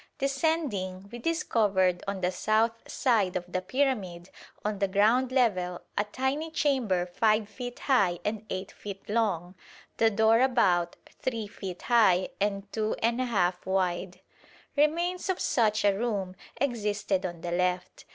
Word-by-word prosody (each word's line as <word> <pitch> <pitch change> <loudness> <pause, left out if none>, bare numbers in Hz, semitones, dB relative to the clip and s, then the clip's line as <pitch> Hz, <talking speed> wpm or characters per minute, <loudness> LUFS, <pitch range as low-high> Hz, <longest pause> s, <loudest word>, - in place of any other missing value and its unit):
Descending, 270 - -1
we 240 - -7
discovered 205 - +1
on 200 -1 -3
the 180 0 +1
south 225 +4 0
side 220 -9 +1
of 180 -1 -2
the 185 +1 -2
pyramid 195 -6 -1 0.3
on 210 -1 -1
the 200 - +2
ground 220 +7 +3
level 185 -9 +1 0.2
a 205 - +1
tiny 265 +8 -2
chamber 255 - +1
5 215 +3 +1
feet 245 +2 -7
high 200 -10 +3
and 215 0 -2
8 185 +1 -4
feet 195 -1 -9
long, 200 -6 0 0.4
the 225 - +4
door 220 +1 +4
about 190 -10 +2 0.3
3 230 -4 -2
feet 190 -3 -8
high 200 -7 +4
and 200 -1 -1
2 215 -1 0
1/2 225 -7 +1
wide. 185 -1 -1 0.5
Remains 340 +6 +1
of 375 - 0
such 220 -3 +2
a 200 - +5
room 200 -4 -2 0.2
existed 210 -7 0
on 175 -3 -5
the 175 - -4
left. 180 +1 -1
210 Hz, 140 wpm, -28 LUFS, 185-245 Hz, 0.5 s, a